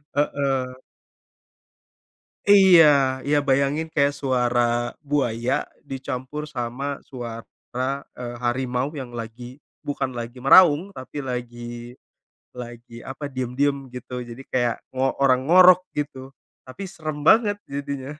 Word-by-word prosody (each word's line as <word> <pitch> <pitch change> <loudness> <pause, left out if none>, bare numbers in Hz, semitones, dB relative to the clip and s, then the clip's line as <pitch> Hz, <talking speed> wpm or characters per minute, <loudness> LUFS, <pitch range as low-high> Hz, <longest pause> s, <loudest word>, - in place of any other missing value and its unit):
heeh. 135 -3 0 1.8
Iya, 155 -10 +6
ya 145 +1 +1
bayangin 140 +3 +1
kayak 140 -1 +2
suara 120 -3 0
buaya 125 -4 -1 0.2
dicampur 135 +2 -5
sama 135 +1 -4
suara, 125 +2 -6 0.2
eee, 120 -1 -6
harimau 125 +2 -1
yang 125 -3 -7
lagi 120 +4 -8 0.2
bukan 140 -2 -2
lagi 120 +2 -7
meraung, 160 +5 +6
tapi 145 -5 -7
lagi, 120 -2 -6 0.6
lagi 120 -1 -10
apa, 140 +4 -7
diam-diam, 135 +2 -1
gitu. 125 0 -6
Jadi 120 +2 -9
kayak 120 -2 +1 0.2
ngo 130 +1 0 0.2
orang 130 0 +3
ngorok, 185 +1 +7
gitu. 135 -2 -5 0.3
Tapi 130 +10 -8
seram 155 -6 -6
banget 210 +5 +5
jadinya. 140 0 -6
130 Hz, 110 wpm, -23 LUFS, 125-145 Hz, 1.8 s, ngorok